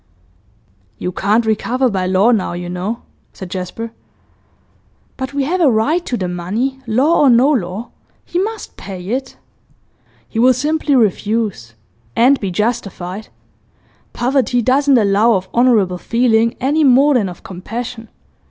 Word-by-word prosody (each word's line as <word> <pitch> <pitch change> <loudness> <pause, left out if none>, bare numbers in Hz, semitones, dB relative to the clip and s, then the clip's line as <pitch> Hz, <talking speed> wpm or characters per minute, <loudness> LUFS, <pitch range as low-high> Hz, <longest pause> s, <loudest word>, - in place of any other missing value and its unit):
'You 180 - -3
can't 210 +5 +1
recover 240 +4 0
by 190 -5 -1
law 190 +5 +3
now, 210 -6 0
you 175 0 -5
know,' 185 +6 -4 0.3
said 185 -2 -9
Jasper. 190 +5 -5 1.2
'But 260 +1 -5
we 280 - +1
have 355 +6 -1
a 310 - +5
right 275 +10 +1
to 245 - -1
the 185 - -2
money, 205 +10 -3
law 265 +9 +2
or 285 - +5
no 250 +4 +5
law. 210 -3 -3 0.3
He 350 - -2
must 440 +3 -4
pay 185 -1 -8
it.' 260 +3 -3 0.9
'He 225 - -4
will 255 +2 +5
simply 295 +2 0
refuse 210 - 0 0.4
and 265 +4 +4
be 195 - -3
justified. 205 -1 -3 0.8
Poverty 245 -1 0
doesn't 275 +2 +3
allow 210 +2 +3
of 190 0 -2
honourable 220 -7 +3
feeling, 230 +1 +1
any 295 +5 +1
more 275 +2 +5
than 215 -7 +1
of 180 - -11
compassion. 225 +5 -7
230 Hz, 145 wpm, -17 LUFS, 195-260 Hz, 1.2 s, a